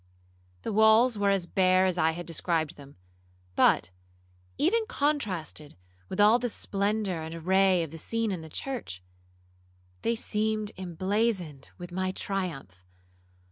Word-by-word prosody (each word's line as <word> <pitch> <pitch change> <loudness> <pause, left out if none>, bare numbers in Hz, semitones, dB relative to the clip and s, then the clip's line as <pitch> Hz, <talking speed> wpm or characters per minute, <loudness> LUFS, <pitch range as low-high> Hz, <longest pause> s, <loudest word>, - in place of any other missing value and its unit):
The - - -3
walls 220 +3 +5
were 200 0 +2
as 195 -3 +1
bare 185 +1 +3
as 185 -2 +1
I 160 -2 +2
had 175 +1 -6
described 165 -1 -1
them, 140 -1 -14 0.6
but, 90 - +3 0.7
even 435 +9 +2
contrasted 195 - -2 0.3
with - - -5
all 215 +4 +6
the 245 0 -1
splendour 200 -4 -1
and 160 +1 -6
array 185 +1 +3
of 160 - -7
the 165 - -9
scene 230 +5 -1
in 180 -4 -3
the 160 - -10
church, 220 - -5 1.0
they 230 - 0
seemed 215 -1 0
emblazoned 185 -4 -2
with 175 0 -9
my 185 +1 -1
triumph. 170 - -5
190 Hz, 140 wpm, -28 LUFS, 165-220 Hz, 1.0 s, all